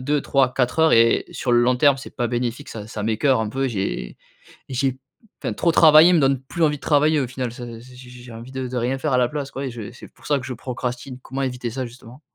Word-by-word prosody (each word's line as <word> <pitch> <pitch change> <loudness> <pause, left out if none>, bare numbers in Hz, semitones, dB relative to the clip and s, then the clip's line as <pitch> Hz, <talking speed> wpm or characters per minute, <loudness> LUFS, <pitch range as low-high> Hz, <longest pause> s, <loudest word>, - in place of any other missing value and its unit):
2-3-4 135 -2 +1
heures 160 0 +5
et 115 0 +4
sur 125 - -3
le 120 - +5
long 125 +1 +3
terme, 140 +1 +4
c'est 135 - -11
pas 120 - -1
bénéfique, 120 +4 -3
ça 105 -2 -7
ça 110 -1 -6
m'écœure 115 +4 +2
un 110 - -2
peu, 135 +4 -1
j'ai 95 - -3 0.5
j'ai 130 +1 0
p 130 - -19 0.4
enfin, - - -2
trop 170 -2 +1
travailler 160 +2 +7
me 165 - +4
donne 135 -1 +2
plus 165 +5 -4
envie 150 -1 +3
de - - -17
travailler, 150 +1 +3
au 130 - -1
final, 125 0 -4
ça 120 +1 -8
j 120 +2 -11
j 125 -1 -13
j 125 0 -12
j'ai 120 - -11
envie 115 +3 -10
de 130 -1 -4
de 125 - -5
rien 125 +2 0
faire 150 0 -2
à 125 - +3
la 125 -1 +3
place, 145 0 -5
quoi 135 - -5
et 130 - -4
je 115 -2 -8
et 105 - -8
c'est 125 - -13
pour - - -18
ça 145 -1 +2
que 130 - -8
je 130 - -5
procrastine. 125 +1 -5
Comment 135 +1 -5
éviter 125 -2 -3
ça, 130 +1 -4
justement? 120 +2 -14
130 Hz, 270 wpm, -22 LUFS, 120-135 Hz, 0.5 s, travailler